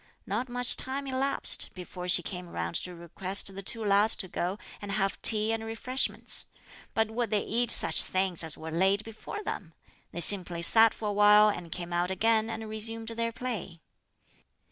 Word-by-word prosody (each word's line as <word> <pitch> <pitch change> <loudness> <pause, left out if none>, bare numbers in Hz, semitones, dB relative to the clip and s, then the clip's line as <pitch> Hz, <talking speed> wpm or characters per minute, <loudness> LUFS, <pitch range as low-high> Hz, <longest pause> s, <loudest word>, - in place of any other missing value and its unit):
Not 230 +6 -3
much 245 0 +1
time 270 +2 -2
elapsed 270 +1 0
before 180 0 -8
she 175 -1 +4
came 180 0 -7
round 85 - -4
to 180 -1 -5
request 185 +3 0
the 195 - -7
two 220 +3 0
lads 205 +2 +5
to 190 - -3
go 180 +2 -3 0.2
and 205 -1 -5
have 195 -1 -2
tea 215 0 +5
and 225 0 -4
refreshments; 225 +4 -2 0.5
but 220 0 0
would 235 0 -2
they 210 -1 0
eat 240 +1 0
such - - +5
things 185 -2 0
as 160 -2 -6
were 160 0 -8
laid 190 +5 +1
before 225 - -8
them? 165 - -6 0.4
They 175 - -5
simply 175 -2 +2
sat 225 +4 +6
for 215 - -4
a - - -2
while 210 +1 +6
and 175 -5 -6
came 175 0 -6
out 175 +1 0
again 220 +3 +1
and 220 -1 -6
resumed 225 +1 -3
their 230 0 -3
play. 220 -8 -6
205 Hz, 185 wpm, -28 LUFS, 180-225 Hz, 0.5 s, sat